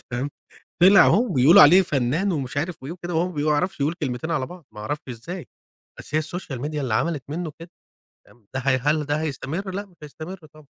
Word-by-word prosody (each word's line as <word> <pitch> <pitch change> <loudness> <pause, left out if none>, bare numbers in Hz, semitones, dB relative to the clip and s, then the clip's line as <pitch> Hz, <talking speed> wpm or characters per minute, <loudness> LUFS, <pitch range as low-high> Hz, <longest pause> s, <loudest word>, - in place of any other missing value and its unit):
فاهم؟ 130 +4 -3 0.5
طِلع 195 +2 +8
أهو 235 - +4
وبيقولوا 150 - +7
عليه 180 +6 +8
فنان 150 +6 0
ومش 140 -4 -4
عارف 160 0 -3
إيه 145 - -5
وكده 175 0 -6
وهو 170 +3 +1
ما 180 - -9
بيعرَفش 150 +4 0
يقول 150 +4 +1
كلمتين 130 +3 -3
على 145 -6 0
بعض، 175 -2 -12
ما 105 - -10
اعرَفش 145 +8 -4
إزاي! 140 +7 -7 0.5
بس - - -11
هي 155 - +3
الsocial 155 -6 -6
media 150 +1 -4
اللي 130 -6 -1
عملت 145 +4 0
منه 160 0 -4
كده 170 - -10 0.6
تمام، 115 -4 -23
ده 130 - -1
ه 135 0 +2
هل 150 +2 +1
ده 145 +1 -1
هيستمر؟ 155 +6 -4
لأ 200 +1 -4
مش 180 - -25
هيستمر 155 +5 -8 0.2
طبعًا. 155 -1 -17
150 Hz, 210 wpm, -23 LUFS, 135-175 Hz, 0.6 s, طِلع